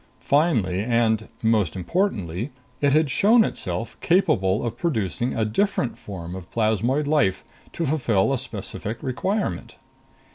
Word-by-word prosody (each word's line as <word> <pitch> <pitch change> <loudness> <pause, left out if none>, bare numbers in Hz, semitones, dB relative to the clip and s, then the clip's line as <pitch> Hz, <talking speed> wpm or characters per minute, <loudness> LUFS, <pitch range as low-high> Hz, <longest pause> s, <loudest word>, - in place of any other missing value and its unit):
Finally, 115 - +2
and 115 -2 +1 0.2
most 110 -7 +2
importantly, 100 - -1 0.3
it 145 -1 +3
had 155 -1 +3
shown 225 - +5
itself - - -3
capable 155 - +2
of 115 -1 -3
producing 120 - -1
a 110 - +1
different 130 - 0
form 90 -4 -8
of 95 -1 -8
plasmoid 115 +6 +1
life 140 -11 +1 0.3
to 170 - -2
fulfill 135 -6 +1
a - - +1
specific 115 +1 -4
requirement. 140 - -2
115 Hz, 130 wpm, -24 LUFS, 100-155 Hz, 0.3 s, shown